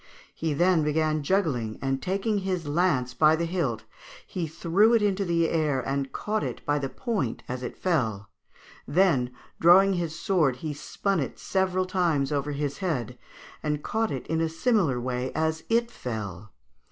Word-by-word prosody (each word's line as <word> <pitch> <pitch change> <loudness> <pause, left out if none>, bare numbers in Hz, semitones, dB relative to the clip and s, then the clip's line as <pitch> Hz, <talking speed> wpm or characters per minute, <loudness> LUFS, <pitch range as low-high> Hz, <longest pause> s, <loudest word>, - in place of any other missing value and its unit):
He 160 -2 -2
then 175 +1 +4
began 155 0 +1
juggling, 140 - 0
and 135 0 -1
taking 200 +3 0
his 185 -4 -2
lance 145 -6 +1
by 155 +2 +5
the 170 +1 -1
hilt, 165 -9 -1 0.4
he 175 -3 -3
threw 175 +8 +3
it 225 - +3
into 200 -1 +1
the 170 -2 +2
air 155 -5 +1
and 135 +1 -2
caught 215 0 -2
it - - -5
by 145 0 +1
the 135 -1 -3
point 200 - -2
as 125 0 -4
it 125 - -6
fell; 115 - 0 0.6
then, 145 -6 +3 0.3
drawing 190 +4 +6
his 170 -3 -2
sword, 170 - +2
he 150 +4 -5
spun 195 +6 -2
it 135 - -3
several 185 -1 0
times 170 -7 +1
over 145 0 -1
his 145 -1 -3
head, 130 - -2 0.5
and 150 -1 -2
caught 225 0 0
it 130 - -4
in 160 0 -1
a 165 - +1
similar 165 - +1
way 125 +1 -2
as 160 +1 0
it 235 +1 +2
fell. 105 - -6
160 Hz, 170 wpm, -27 LUFS, 135-185 Hz, 0.6 s, drawing